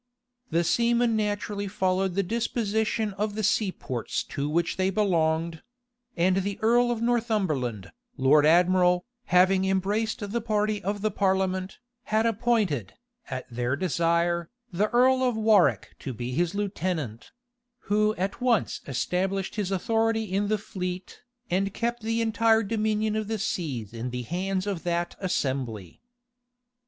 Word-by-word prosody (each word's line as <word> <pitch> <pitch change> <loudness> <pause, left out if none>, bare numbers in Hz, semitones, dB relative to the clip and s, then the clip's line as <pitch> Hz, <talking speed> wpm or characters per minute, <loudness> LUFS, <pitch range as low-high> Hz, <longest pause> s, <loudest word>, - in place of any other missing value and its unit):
The 170 +1 +2
seamen 235 +4 +2
naturally 205 -1 -2
followed 190 -1 0
the 200 - +2
disposition 220 0 -1
of 210 0 -1
the 215 - -2
sea 205 -1 +2
ports 125 -9 -4
to 145 +1 -2
which 170 +2 0
they 190 0 +1
belonged: 165 -5 +1 0.6
and 185 +2 +3
the 195 +1 -1
earl 240 +2 +4
of 235 -1 -1
Northumberland, 190 - 0 0.3
lord 145 +3 +5
admiral, 180 +2 +4 0.2
having 185 0 +4
embraced 205 +3 0
the 235 +1 -1
party 215 -2 0
of 200 +2 -2
the 215 0 0
parliament, 190 -1 0 0.3
had 220 +1 +1
appointed, 215 - 0 0.3
at 130 -1 -5
their 120 +2 -1
desire, 170 0 +1 0.2
the 205 +5 +1
earl 255 +2 +4
of 250 -3 +1
Warwick 215 -4 +3
to 135 - -5
be 120 +2 -4
his 170 +7 0
lieutenant; 180 - -3 0.5
who 215 +1 +1
at 195 +5 -3
once 245 -4 +1
established 185 +8 -1
his 210 -3 -2
authority 225 +3 +1
in 200 0 -1
the 215 +1 +1
fleet, 180 -3 -6 0.3
and 195 +2 0
kept 235 +1 -2
the 225 +1 0
entire 225 0 +3
dominion 215 0 0
of 215 -1 -2
the 220 0 -2
sea 155 - -3
in 120 +2 -4
the 125 0 -4
hands 185 - -2
of 195 -5 -3
that 175 0 -2
assembly. 130 - -3
195 Hz, 145 wpm, -26 LUFS, 170-215 Hz, 0.6 s, lord